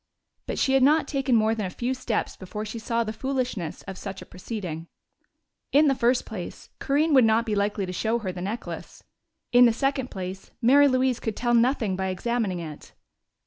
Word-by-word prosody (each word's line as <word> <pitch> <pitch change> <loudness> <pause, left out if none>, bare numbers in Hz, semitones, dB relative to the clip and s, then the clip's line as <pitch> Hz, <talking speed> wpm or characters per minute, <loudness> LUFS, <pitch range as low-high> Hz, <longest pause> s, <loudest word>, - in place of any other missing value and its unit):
But - - -3
she 265 - +2
had 270 - +4
not 300 +4 +4
taken 270 -3 +1
more 220 0 +3
than 215 -4 -2
a - - -5
few 245 +7 -2
steps 250 -4 -2
before 210 +3 -6
she 220 +2 -6
saw 230 +1 0
the 215 -1 -4
foolishness 250 - -3
of 195 -1 -8
such 195 -1 -6
a - - -10
proceeding. 180 -4 -6 0.8
In 295 +2 +5
the - - +4
first 245 0 +2
place, 195 -6 -8
Corinne 300 +3 +1
would 260 -3 +7
not 225 +1 +3
be 220 - -1
likely 200 0 0
to 180 - -5
show 220 +5 0
her 205 -5 -4
the 180 -1 -7
necklace; 210 +6 -6 0.5
in 245 0 +7
the 235 - +5
second 270 +1 -1
place, 190 0 -6
Mary 280 +5 +6
Louise 255 -2 +2
could 220 -3 -3
tell 240 -1 0
nothing 235 -4 +2
by 190 0 -2
examining 200 +1 -1
it. 155 -3 -8
230 Hz, 200 wpm, -26 LUFS, 195-255 Hz, 0.8 s, would